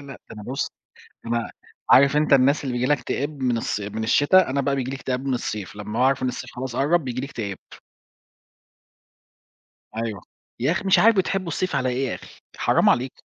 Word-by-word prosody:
ده - - -12
أنا 105 - -9
بُص 130 +5 -3 0.5
أنا 115 0 -1 0.4
عارف 140 +2 +6
أنت 150 -1 +2
الناس 140 +2 +4
اللي 130 - -2
بييجي 125 +1 0
لها 145 +2 +3
اكتئاب 140 +2 -3
من 125 -2 +1
الص 105 - -2
من 105 +2 -4
الشتا، 145 +9 +4
أنا 140 +1 0
بقى 140 0 0
بييجي 130 -1 -2
لي 135 - -4
اكتئاب 130 0 -3
من 135 - 0
الصيف 105 -4 -4
لمّا 105 +2 -5
باعرف 130 +1 +2
إن 130 - +1
الصيف 125 - -6
خلاص 125 -1 -5
قرّب، 150 +3 +2
بييجي 125 -1 -3
لي 135 - -4
اكتئاب. 100 -9 -5 2.4
أيوة، 110 -4 -3 0.4
يا 135 +7 +2
أخي 185 - -3
مش 190 - +4
عارف، 225 0 +5
بتحبوا 190 -1 0
الصيف 165 -1 -1
على 130 -2 0
إيه 130 +1 -1
يا - - -3
أخي؟ - - -13
حرام - - +3
عليك. 130 +2 0
130 Hz, 195 wpm, -23 LUFS, 120-145 Hz, 2.4 s, عارف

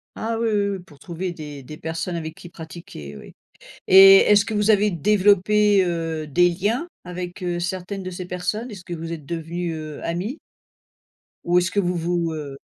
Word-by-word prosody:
Ah 225 +1 -3
oui, 230 -1 +1
oui, 205 -1 +1
oui - - -11
pour 155 -6 -17
trouver 175 +2 -5
des 150 -4 -9
des 150 +4 -10
personnes 165 +2 -4
avec 160 -1 -5
qui 180 -2 -12
pratiquer, 160 - -10
oui - - -13 0.5
et 195 +1 +10
est-ce 205 -1 +5
que 220 - -4
vous 210 +1 +2
avez 210 0 +4
développé, 205 +2 +3
heu, 165 -3 -3
des 175 +5 +3
liens 210 - -1 0.2
avec, 180 +1 -6
heu, 175 -1 -2
certaines 185 +2 -4
de 185 - -5
ces 180 0 -7
personnes? 180 +7 -3
Est-ce 195 -4 -9
que 175 - -6
vous 165 0 -6
êtes 155 -4 -7
devenus, 170 +1 -4
heu, 155 -1 -7
amis 185 - -3 1.1
ou 175 +1 +2
est-ce 180 +1 -1
que 205 - +1
vous 180 -1 0
vous, 170 -1 -1
heu 145 -3 -6
175 Hz, 195 wpm, -22 LUFS, 165-200 Hz, 1.1 s, et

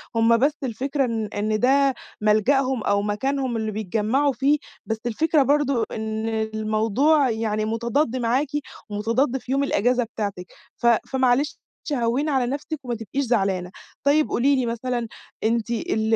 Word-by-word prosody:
هُم 230 0 +4
بس 290 +5 +1
الفكرة 270 +3 -1
إن 225 -3 -2
إن 215 +1 0
ده 275 +2 +4 0.3
ملجأهم، 240 +4 +2
أو 200 0 +2
مكانهم 255 +4 -1
اللي 220 -1 -2
بيتجمعوا 220 +7 0
فيه، 275 +4 +2 0.3
بس 225 - -2
الفكرة 295 +5 +2
برضه 285 +1 +2 0.2
إن 220 0 -3
الموضوع 220 +6 +1
يعني 220 -1 -1
متضاد 235 +4 0
معاكِ، 250 +4 +1 0.4
ومتضاد 230 +6 0
في 255 - -8
يوم 275 +1 +2
الإجازة 245 -1 +2
بتاعتِك، 205 -5 -5 0.3
ف 240 - 0 0.2
فمعلش 265 +2 +1 0.3
هوّني 250 +4 0
على 265 -3 +2
نفسِك، 290 +4 -4
وما 240 -1 -2
تبقيش 230 +5 -3
زعلانة. 195 -6 0 0.3
طيّب 295 +2 +3
قولي 275 +4 +3
لي 260 -2 0
مثلًا، 235 0 -2 0.4
أنتِ 230 +1 +1
ال 220 -1 0
235 Hz, 145 wpm, -23 LUFS, 220-270 Hz, 0.4 s, هُم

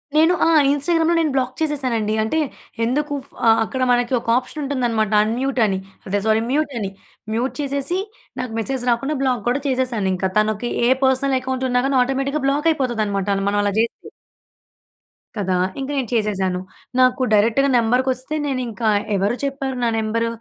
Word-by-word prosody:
నేను 325 +3 +5
ఆ! - - +4 0.2
ఇంస్టాగ్రామ్‌లో 330 +3 +1
నేను 310 -3 +1
బ్లాక్ 260 -1 0
చేసేసానండి. 255 -8 0
అంటే, 315 +9 0 0.5
ఎందుకు 290 +4 -1
ఫ - - -23 0.3
అక్కడ 260 +3 -4
మనకి 245 +1 +1
ఒక - - -15
ఆప్షన్ 295 +4 -4
ఉంటుందనమాట, 240 -6 0
అన్‍మ్యూట్ 255 +4 -1
అని. 190 -2 0 0.3
అదే 200 +2 0
సారీ 220 +1 +3
మ్యూట్ 295 -1 0
అని. 195 -2 -2 0.4
మ్యూట్ 245 +4 -1
చేసేసి, 280 +6 -1 0.4
నాకు 250 -2 -3
మెసేజ్ 255 +2 -2
రాకుండా 275 +6 -1
బ్లాక్ 250 -5 0
కూడా 270 +3 0
చేసేసాను 250 -7 0
ఇంక. 185 +1 -2
తనకి 215 +2 +1 0.2
ఏ - - +4 0.2
పర్సనల్ 265 0 +2
అకౌంట్ 260 0 -3
ఉన్నా 250 0 +2
గాని, 275 -1 +1
ఆటోమేటిక్‌గా 270 +3 -1
బ్లాక్ 295 +4 +1
అయిపోతుంది 250 -7 -1
అనమాట 200 -1 -2 0.2
మనం 205 0 +1
అలా 200 -1 0
జేస్తే. 230 0 -2 1.3
కదా! 190 -2 0 0.2
ఇంకా 270 +2 -4
నేను 255 -4 -2
చేసేశాను. 195 -5 0 0.4
నాకు 255 0 +4
డైరెక్ట్‌గా 230 +7 +3
నెంబర్‌కొస్తే, 255 +4 0
నేను 260 -2 -1
ఇంకా 225 0 -1 0.3
ఎవరు 200 +5 +1
చెప్పారు 270 -1 -3
నా 235 - +3
నెంబర్? 230 +1 0
255 Hz, 160 wpm, -21 LUFS, 220-275 Hz, 1.3 s, నేను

